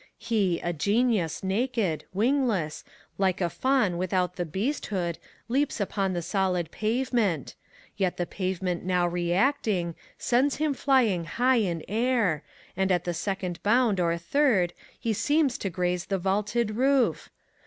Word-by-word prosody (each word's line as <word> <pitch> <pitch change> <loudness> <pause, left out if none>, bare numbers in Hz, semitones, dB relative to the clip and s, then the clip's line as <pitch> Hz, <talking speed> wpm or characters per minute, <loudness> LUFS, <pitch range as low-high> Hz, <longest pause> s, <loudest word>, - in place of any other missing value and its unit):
He> 200 -7 0
a 175 - -1
Qenius 205 - +1
naked, 195 - 0
wingless, 215 - 0 0.4
like 190 -2 +2
a 175 -3 0
Faun 255 -10 +1
without 180 -1 0
the 175 -2 -3
beasthood. 190 - -2 0.3
Leaps 270 +3 0
upon 195 -1 -1
the 175 -1 -2
solid 180 -3 0
pavement: 220 - 0 0.4
yet 190 -3 0
the 175 - -1
pavemoat 185 -1 -2
now 180 -1 +1
reacting. 175 +1 0 0.2
Sends 260 +3 +2
him 305 -1 0
flying 245 -11 +2
high 250 +8 +2
in 175 -7 0
air, 220 - +1 0.3
and 190 +1 +1
at 175 -1 +2
the 175 - -2
seoond 180 0 -3
bound 225 -2 +3
or 170 -1 +1
third, 190 - +2 0.3
he 230 -3 0
Seems 290 +3 +1
to 195 - -2
graze 180 0 -1
the 195 - 0
vaulted 205 +4 0
roof. 265 0 +2
195 Hz, 140 wpm, -27 LUFS, 175-240 Hz, 0.4 s, bound